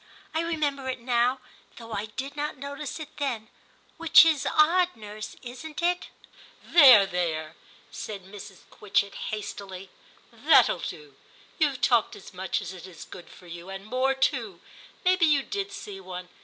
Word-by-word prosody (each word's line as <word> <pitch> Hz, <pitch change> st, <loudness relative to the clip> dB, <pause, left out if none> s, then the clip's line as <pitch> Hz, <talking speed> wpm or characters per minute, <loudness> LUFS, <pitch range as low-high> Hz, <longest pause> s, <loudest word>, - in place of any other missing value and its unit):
I 320 Hz, -, +1 dB
remember 295 Hz, -5 st, -2 dB
it 255 Hz, -, -3 dB
now, 245 Hz, +2 st, +1 dB, 0.4 s
though 230 Hz, -1 st, -10 dB
I 205 Hz, +1 st, -2 dB
did 265 Hz, +6 st, -6 dB
not 295 Hz, 0 st, -3 dB
notice 280 Hz, +2 st, -6 dB
it 310 Hz, -1 st, -9 dB
then, 240 Hz, -6 st, -3 dB, 0.5 s
which 330 Hz, 0 st, +7 dB
is 315 Hz, -4 st, +2 dB
odd, 350 Hz, +4 st, +3 dB
nurse, 215 Hz, -1 st, -8 dB
isn't 260 Hz, +6 st, -8 dB
it? 355 Hz, +1 st, +1 dB, 0.6 s
There, 260 Hz, -, +8 dB
there,' 165 Hz, -4 st, -3 dB, 0.4 s
said 200 Hz, -3 st, -7 dB
Mrs. 195 Hz, 0 st, -11 dB
Quitchett 200 Hz, -1 st, 0 dB, 0.2 s
hastily, 195 Hz, -3 st, -7 dB, 0.2 s
* -, -, -30 dB
that'll -, -, +4 dB
do; 435 Hz, -2 st, -8 dB, 0.4 s
you've 280 Hz, -5 st, +1 dB
talked 240 Hz, -3 st, +3 dB
as 190 Hz, -, -13 dB
much 190 Hz, +2 st, -2 dB
as 190 Hz, 0 st, -7 dB
is 180 Hz, -2 st, -11 dB
good 175 Hz, -, -12 dB
for 180 Hz, -, -16 dB
you, 170 Hz, +1 st, -9 dB
and 195 Hz, +1 st, -7 dB
more 255 Hz, +4 st, +1 dB
too; 240 Hz, -, -1 dB, 0.5 s
maybe 365 Hz, -2 st, +4 dB
you 290 Hz, -3 st, +3 dB
did 400 Hz, +3 st, -4 dB
see 195 Hz, -2 st, -8 dB
one. 180 Hz, -1 st, -8 dB
240 Hz, 155 wpm, -27 LUFS, 195-295 Hz, 0.6 s, There